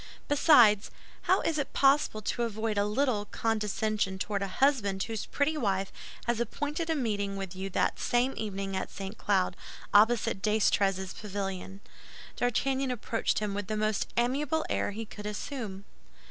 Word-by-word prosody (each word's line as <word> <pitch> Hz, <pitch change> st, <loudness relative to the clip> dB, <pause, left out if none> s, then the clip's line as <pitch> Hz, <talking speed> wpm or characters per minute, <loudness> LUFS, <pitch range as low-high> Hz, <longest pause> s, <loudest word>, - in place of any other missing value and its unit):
Besides, 245 Hz, -9 st, +6 dB, 0.3 s
how -, -, +3 dB
is 310 Hz, -2 st, 0 dB
it 280 Hz, -, -3 dB
possible 275 Hz, -6 st, +3 dB
to 240 Hz, -, -2 dB
avoid 220 Hz, -1 st, -1 dB
a 205 Hz, 0 st, +2 dB
little 220 Hz, -2 st, +1 dB
condescension 215 Hz, -2 st, -1 dB
toward 200 Hz, +1 st, -2 dB
a 200 Hz, -, -1 dB
husband 200 Hz, -4 st, +1 dB
whose 225 Hz, -2 st, -4 dB
pretty 295 Hz, +2 st, 0 dB
wife 195 Hz, -8 st, 0 dB, 0.3 s
has 235 Hz, -1 st, 0 dB
appointed 295 Hz, +7 st, -2 dB
a 320 Hz, -, +2 dB
meeting 205 Hz, -7 st, -1 dB
with 190 Hz, -2 st, -5 dB
you 190 Hz, +1 st, -4 dB
that -, -, 0 dB
same 245 Hz, +2 st, +1 dB
evening 195 Hz, -2 st, -3 dB
at -, -, -2 dB
St. 195 Hz, +2 st, -7 dB
Cloud, 190 Hz, -4 st, +1 dB, 0.4 s
opposite 215 Hz, -1 st, +4 dB
D'Estrées's 195 Hz, -3 st, +2 dB
pavilion? 195 Hz, -1 st, -5 dB, 0.5 s
D'Artagnan 265 Hz, +2 st, 0 dB
approached 230 Hz, -2 st, -1 dB
him 210 Hz, -2 st, -1 dB
with 205 Hz, -1 st, -4 dB
the 215 Hz, 0 st, -2 dB
most 215 Hz, -1 st, 0 dB
amiable 275 Hz, +6 st, +1 dB
air -, -, 0 dB
he 220 Hz, +3 st, -5 dB
could 210 Hz, -1 st, -8 dB
assume. 210 Hz, -3 st, -5 dB
215 Hz, 155 wpm, -29 LUFS, 200-245 Hz, 0.5 s, Besides